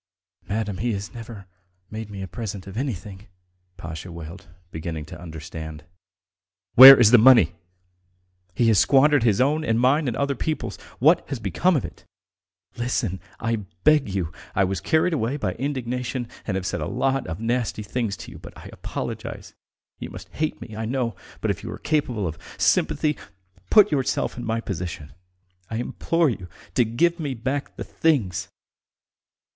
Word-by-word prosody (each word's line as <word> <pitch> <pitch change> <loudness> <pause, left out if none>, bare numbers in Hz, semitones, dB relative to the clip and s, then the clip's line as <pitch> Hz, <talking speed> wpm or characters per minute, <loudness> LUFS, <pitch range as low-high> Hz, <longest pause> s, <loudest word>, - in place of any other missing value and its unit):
"Madam, 105 -3 -2
he 120 +2 0
has 100 +3 -5
never 115 -4 -9 0.5
made 110 -1 -6
me 100 -2 -6
a - - -5
present 100 +1 -6
of 95 0 -9
anything!" 105 -5 -5 0.5
Pasha 80 +1 -7
wailed, 85 +3 -9 0.2
beginning 80 -1 -5
to 75 - -11
understand. 80 -1 -8 0.9
"Where 135 +1 +12
is 110 -3 +6
the 125 - +8
money? 115 - +7 1.0
He 120 - +2
has 110 - +5
squandered 145 +1 +5
his 110 -4 +2
own 150 +4 +2
and 115 -6 +1
mine 135 +4 +3
and 120 - -2
other 140 0 0
people's.... 155 +4 -3 0.2
What - - +3
has - - -2
become 185 0 +1
of 140 - 0
it - - -10 0.7
all? - - -6
Listen, 120 -6 -1 0.2
I 115 0 0 0.3
beg 155 -5 +4
you! 95 -4 -2 0.2
I 100 - +3
was 95 0 -1
carried 160 +2 +2
away 130 -1 -1
by - - -1
indignation 125 -2 -3 0.2
and 100 - -1
have 95 -1 -2
said - - -2
a - - -2
lot 135 0 0
of 80 +1 -5
nasty 115 -1 -1
things 105 -1 -2
to - - -11
you, - - -11
but - - -12
I - - -11
apologize. - - -6 0.5
You - - -6
must - - -10
hate 155 0 -3
me, 110 - -9
I 110 +1 -3
know, 120 -2 -1 0.3
but - - +1
if - - -5
you - - -6
are - - -6
capable 125 -9 -1
of 80 -1 -4 0.2
sympathy, 150 -1 +2 0.5
put 210 - +6
yourself 135 -3 0
in 120 - -6
my 115 0 -1
position! 85 - -6 0.6
I 110 - -4
implore 155 +6 0
you 95 -5 -7 0.3
to 120 - +3
give 170 +10 +1
me 145 -5 -3
back 130 +5 -3
the - - -5
things!" 125 - 0
115 Hz, 175 wpm, -24 LUFS, 95-135 Hz, 1.0 s, Where